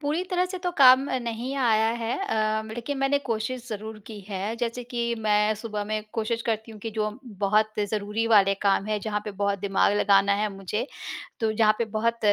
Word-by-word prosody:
पूरी 305 +4 -1
तरह 360 0 +2
से 370 0 -6
तो 355 0 -2
काम 260 0 +8
अ, 260 - 0
नहीं 240 +2 -4
आया 225 -4 +3
है 230 +1 -1
अ, 220 - 0
लेकिन 245 +4 -4
मैंने 275 +1 +2
कोशिश 245 -1 -3
ज़रूर 220 0 -6
की 215 -2 -8
है 200 +2 -3
जैसे 240 +1 -3
कि 235 -1 -2
मैं 210 0 +2
सुबह 210 -1 -4
में 215 +1 -2
कोशिश 230 0 -1
करती 225 0 -2
हूँ 215 - -11
कि 225 - -4
जो 215 -1 -1 0.3
बहुत 215 +2 +3 0.2
ज़रूरी 210 +1 -1
वाले 200 -3 +5
काम 200 0 +2
है, 215 0 0
जहाँ 210 0 -2
पे 210 - -4
बहुत 200 0 -1
दिमाग 195 +1 +2
लगाना 200 0 +4
है 210 +1 0
मुझे 205 +5 -3 0.5
तो 225 -1 +1
जहाँ 215 -1 +4
पे 235 - 0
बहुत 230 +1 0
220 Hz, 205 wpm, -26 LUFS, 210-240 Hz, 0.5 s, काम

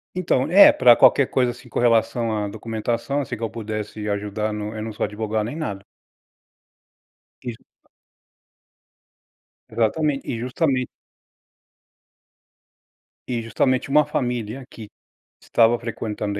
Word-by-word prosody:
Então 160 -6 0
é 195 +4 +9
pra 125 -2 +6
qualquer 140 +2 +5
coisa, 125 -2 +1
assim, 125 +1 -14
com - - -3
relação 115 -1 +2
à 105 -1 -2
documentação, 115 +6 -3
assim, 125 -3 -5
que 115 - -8
eu 115 - -1
pudesse 110 -1 -5
ajudar 105 +1 -2
no 105 +1 -5
eu 110 - -5
não 110 - -5
sou - - -4
advogado 105 +1 -2
nem 120 - -5
nada. 100 -12 -5 1.6
Exa 120 -2 -7 2.1
Exatamente 135 +6 0
e 115 - -3
justamente 130 +1 0 2.4
E 120 -2 -1
justamente 130 +4 0
uma 150 +1 +4
família 125 -3 -3
que 110 -2 -10 0.5
estava 115 +1 +3
frequentando 105 -3 -4
115 Hz, 120 wpm, -22 LUFS, 110-130 Hz, 2.4 s, é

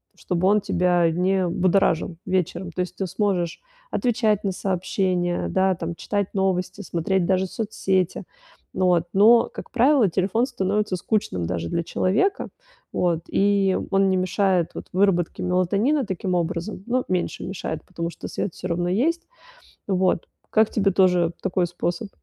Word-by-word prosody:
чтобы 180 0 -1
он 210 +1 +4
тебя 175 -2 +2
не 185 +2 +1
будоражил 175 -1 +1
вечером. 185 -1 -1
То 180 - -3
есть, 180 0 -4
ты 195 - -2
сможешь 180 -3 -1 0.3
отвечать 220 -5 +1
на 195 - 0
сообщения, 185 -1 -1
да 190 0 +2
там, 165 0 -4
читать 200 +3 -3
новости, 190 0 -1
смотреть 180 0 -1
даже 190 0 +2
соцсети. 190 -3 -1 0.5
Ну 185 0 0
вот, 175 -2 +3
но, 225 +4 +6
как - - -9
правило, 250 -2 +4
телефон 195 +7 +1
становится 210 -5 -1
скучным 175 - -1
даже 85 -1 -3
для 170 - -1
человека, 210 - 0 0.4
вот, 170 -2 +1
и 195 -1 +2
он 195 0 +3
не 190 - +2
мешает, 185 -1 +1
вот, - - -7
выработке 185 -3 +1
мелатонина 200 - +1
таким 190 -2 -2
образом. 175 +3 -3
Ну, 250 +1 0
меньше 185 -1 -2
мешает, 170 -4 -4
потому 170 -2 -4
что - - -8
свет 185 - -3
всё 185 - -5
равно 175 0 -1
есть. 315 - 0 0.6
Вот, 185 -3 +1 0.2
как 220 0 +3
тебе 195 -2 +1
тоже 180 -3 +3
такой 180 0 0
способ? 175 +3 -3
185 Hz, 150 wpm, -23 LUFS, 175-200 Hz, 0.6 s, но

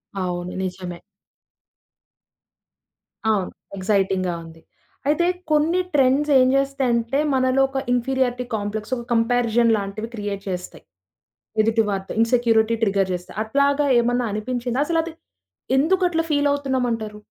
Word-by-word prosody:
అవును. 180 -2 -3
నిజమే. 180 -2 -5 2.3
అవును. 200 -4 +1 0.3
ఎక్సైటింగ్‌గా 190 -2 +1
ఉంది. 165 0 -13 0.5
అయితే 305 +4 +2 0.3
కొన్ని 310 +4 +3
ట్రెండ్స్ 280 +1 +3
ఏం 255 - +5
జేస్తాయంటే 270 -2 +1
మనలో 260 0 +2
ఒక 270 0 -2
ఇన్ఫీరియర్టీ 250 0 0
కాంప్లెక్స్ 215 +3 -4
ఒక 240 - -6
కంపారిజన్ 235 0 +2
లాంటివి 205 +3 -5
క్రియేట్ 205 -2 -4
చేస్తాయి 180 -1 -6 0.8
ఎదుటివారితో. 215 -3 0
ఇన్‌సెక్యూరిటీ 230 -1 +3
ట్రిగర్ 195 -3 +2
జేస్తే. 180 0 -5
అట్లాగా 280 +5 +2
ఏమన్నా 245 +1 0
అనిపించిందా? 245 +4 -2
అసలది 330 -1 0 0.7
ఎందుకట్లా 350 +2 +2
ఫీల్ 290 -1 +2
అవుతున్నామంటారు? 245 -6 -2
235 Hz, 105 wpm, -22 LUFS, 205-270 Hz, 2.3 s, ఏం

